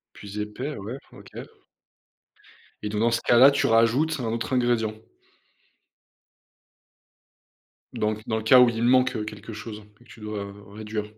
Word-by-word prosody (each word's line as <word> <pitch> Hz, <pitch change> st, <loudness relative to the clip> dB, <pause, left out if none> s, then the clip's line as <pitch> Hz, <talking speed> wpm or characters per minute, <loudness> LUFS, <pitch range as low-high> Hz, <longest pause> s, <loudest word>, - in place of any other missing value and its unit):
Plus 100 Hz, +1 st, -8 dB
épais, 125 Hz, +8 st, -5 dB
ouais, 110 Hz, +7 st, -6 dB, 0.2 s
OK -, -, -14 dB, 1.5 s
et 105 Hz, -, -3 dB
donc, 105 Hz, 0 st, -3 dB
dans 115 Hz, 0 st, +2 dB
ce 115 Hz, -, 0 dB
cas-là, 130 Hz, +4 st, +6 dB
tu 140 Hz, -, +1 dB
rajoutes 120 Hz, +8 st, +2 dB
un 120 Hz, -, -4 dB
autre 115 Hz, +3 st, -3 dB
ingrédient? 120 Hz, -3 st, +1 dB, 3.0 s
Donc, 110 Hz, 0 st, -2 dB
dans 110 Hz, -, -1 dB
le 110 Hz, -, -4 dB
cas 125 Hz, +3 st, +7 dB
où 125 Hz, -, +6 dB
il 115 Hz, 0 st, -3 dB
manque, 130 Hz, +1 st, +3 dB
heu, 105 Hz, -, -4 dB
quelque 105 Hz, +1 st, -9 dB
chose 105 Hz, 0 st, -8 dB
que 120 Hz, -, -23 dB
tu 115 Hz, -, -16 dB
dois 100 Hz, -2 st, -6 dB, 0.2 s
réduire? 105 Hz, 0 st, -5 dB
115 Hz, 150 wpm, -25 LUFS, 105-120 Hz, 3.0 s, cas